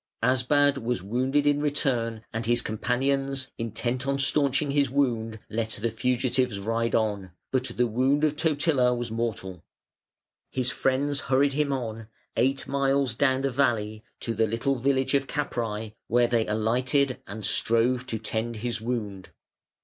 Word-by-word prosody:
Asbad 135 +3 +3
was 120 -5 -2
wounded 130 +7 +1
in 145 0 +3
return 120 -6 -1
and 115 0 -3
his 120 0 +2
companions 135 +4 -1
intent 120 +3 -2
on 140 0 +1
staunching 140 +1 +2
his 140 -2 +2
wound 120 -5 0
let 110 0 -2
the 115 +2 -1
fugitives 125 -1 0
ride 115 +3 -1
on, 100 -5 -1 0.2
but 130 -1 +1
the 125 - 0
wound 130 +6 +1
of 155 -1 +2
Totila 145 -5 +2
was 120 -2 -4
mortal. 105 -6 -3 0.9
His 130 -1 -1
friends 140 +2 0
hurried 135 +2 +2
him 145 0 0
on, 115 -4 -4 0.3
eight 135 +1 +1
miles 135 -2 +1
down 130 +2 +2
the 135 0 0
valley, 110 -5 0 0.2
to 115 - -2
the 110 0 +2
little 115 +5 0
village 130 +2 +1
of 140 -1 +2
Capræ, 115 -7 -3
where 120 +1 +3
they 115 -2 +1
alighted 125 +5 +1
and 105 +1 -6
strove 115 +4 +2
to 115 - -2
tend 115 +1 -3
his 115 0 -3
wound. 105 -5 -4
125 Hz, 150 wpm, -26 LUFS, 115-135 Hz, 0.9 s, Asbad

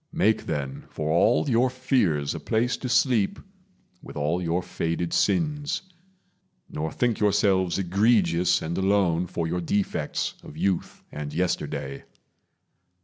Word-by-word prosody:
Make, 110 -10 +1
then, 70 -2 -4
for 75 0 -3
all 105 - +3
your 125 0 +3
fears 125 - +1
a - - -5
place 120 +3 0
to 125 - -5
sleep 120 -6 +2 0.6
With - - -10
all 75 +5 0
your 85 +1 -1
faded 85 -1 -2
sins; 150 -2 0 0.8
nor 80 +1 -4
think 120 -3 0
yourselves 100 -3 +2
Egregious 95 -2 +2
and 80 +2 -3
alone 95 -3 +2
for 85 -1 -3
your 90 +2 -2
defects 100 +4 -1
Of - - -12
youth 95 -3 -1
and 75 -1 -5
yesterday. 75 -4 -2
95 Hz, 130 wpm, -25 LUFS, 85-115 Hz, 0.8 s, all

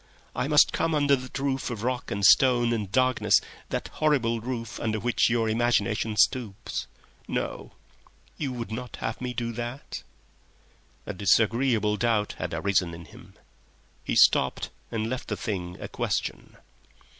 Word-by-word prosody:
I - - -1
must 150 +1 +5
come 165 -1 +1
under 145 -1 +4
that 130 -1 -7
roof 135 -1 -1
of 115 -3 -5
rock 125 0 -2
and 100 0 0
stone 120 -1 +5
and 105 -4 -3
darkness, 130 +1 +3 0.3
that - - -3
horrible 130 -7 +1
roof 115 -1 -5
under 110 -1 -1
which 120 +2 +2
your 115 -1 +1
imaginations 115 -2 +2
stoop... 115 -7 -4 0.6
No; - - -4 0.6
you 140 -4 -3
would 115 -4 -5
not 120 +1 -5
have 110 - -4
me 125 0 -2
do 115 -1 -2
that?" 120 +3 -6 1.0
A 105 - -4
disagreeable 110 +3 +2
doubt 110 -3 +1
had - - -3
arisen 90 -4 0
in 85 0 -11
him. 75 - -16 0.7
He - - -2
stopped 65 - +4 0.2
and 110 -1 -2
left 130 +2 -4
the - - -3
thing 90 -5 -4
a - - -5
question. - - -3
115 Hz, 150 wpm, -27 LUFS, 105-130 Hz, 1.0 s, must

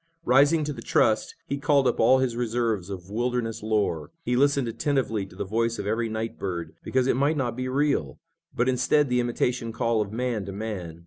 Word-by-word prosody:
Rising 145 +5 +4
to 150 0 -3
the - - -9
trust, 110 -1 +1
he 140 - -3
called 140 -1 +3
up 125 - 0
all 125 +4 +6
his 130 -3 0
reserves 115 -5 -1
of 95 -1 -7
wilderness 120 0 -1
lore. 105 -8 0
He 125 - 0
listened 140 -1 +3
attentively 115 -4 -1
to 90 - -16
the 95 - -4
voice 115 +3 0
of - - -4
every 115 +2 0
night 110 +1 -4
bird, 85 -4 -4
because 130 -1 +1
it 130 - +2
might 145 +4 +2
not 120 -4 -1
be 130 +1 -3
real, 135 - 0 0.3
but 120 - 0
instead 135 +3 +2
the 125 0 +2
imitation 120 -1 -1
call 115 -1 0
of 100 -1 -3
man 120 -2 -2
to - - -4
man. 95 -6 -5
115 Hz, 205 wpm, -26 LUFS, 110-130 Hz, 0.3 s, all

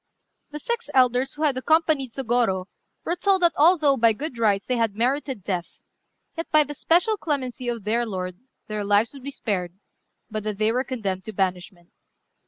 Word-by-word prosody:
The 300 - -6
six 470 +8 -4
elders 255 +1 +3
who 300 - -4
had 290 -4 +3
accompanied 310 -1 +2
Sôgorô 230 -7 0 0.4
were 340 - -1
told 380 0 +2
that 340 - +5
although 305 -3 +4
by 230 -1 +4
good 265 +1 -6
rights 205 -3 +2
they 250 - -1
had 225 -3 0
merited 255 -1 -1
death, 175 -3 -4 0.5
yet 330 0 -5
by 305 -1 +6
the 295 0 -7
special 350 +9 +2
clemency 260 -7 -3
of 235 -3 -3
their 230 +4 +1
lord 185 -5 -5 0.3
their 215 -1 -4
lives 205 +4 +2
would 275 - -11
be 275 - -6
spared, 185 -9 -3 0.5
but 215 -1 -4
that 210 -1 -3
they 215 +1 +2
were 250 +2 0
condemned 200 -8 -4
to 220 - -6
banishment. 185 -2 -3
240 Hz, 185 wpm, -24 LUFS, 205-290 Hz, 0.5 s, by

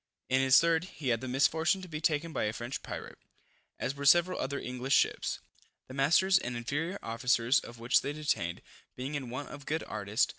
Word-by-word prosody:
In 130 +1 +3
his 130 -1 +7
third, 165 0 +2
he 150 -7 -5
had 115 -2 +1
the 130 - -5
misfortune 160 +8 +2
to - - -8
be 155 -2 -6
taken 155 +1 0
by - - 0
a 105 - -1
French 120 +6 -5
pirate, - - -8 0.6
as 135 - -2
were 140 0 -7
several 175 +5 +5
other 140 +1 -2
English 125 +1 -1
ships, - - +1 0.5
the 130 - -10
masters 170 +8 +4
and 120 0 -4
inferior 145 +10 -2
officers 115 +2 +2
of 120 - -11
which 115 +1 +3
they 140 - -3
detained, 145 - -2 0.3
being 130 +3 -5
in 135 -4 -4
want 130 +4 -5
of 140 -2 -10
good 160 +1 -1
artists. 105 +3 0
135 Hz, 200 wpm, -31 LUFS, 120-155 Hz, 0.6 s, his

